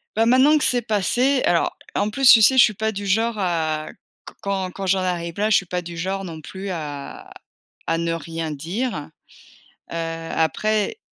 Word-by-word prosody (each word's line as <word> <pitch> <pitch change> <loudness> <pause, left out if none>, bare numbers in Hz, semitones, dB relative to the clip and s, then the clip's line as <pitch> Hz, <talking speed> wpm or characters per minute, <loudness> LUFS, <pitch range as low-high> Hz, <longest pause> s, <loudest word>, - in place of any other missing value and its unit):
Bah, 225 +1 +3
maintenant 260 +6 +5
que 300 - -1
c'est 245 -1 +3
passé 240 +5 +1
alors 170 - +1 0.2
en 205 - +1
plus 265 +4 +3
tu 225 - +9
sais? 260 +5 +5
Je 250 - +9
suis 215 - +2
pas 220 +2 -2
du 200 -1 -6
genre 225 +3 +1
à 160 -4 -1 0.4
q - - -11
quand 195 -2 -2
quand 195 +1 -6
j'en 190 0 +2
arrive 170 -2 -3
là 215 +1 +1
je 215 - +4
suis 195 - +2
pas 180 0 -3
du 170 0 -9
genre 190 +3 -3
non 160 -3 -8
plus 190 +5 -7
à 150 -5 -7 0.6
à 165 - +1
ne 170 0 -1
rien 165 -1 -5
dire. 165 - -4 0.8
Heu, - - -5
après 165 - -1
190 Hz, 195 wpm, -22 LUFS, 165-220 Hz, 0.8 s, tu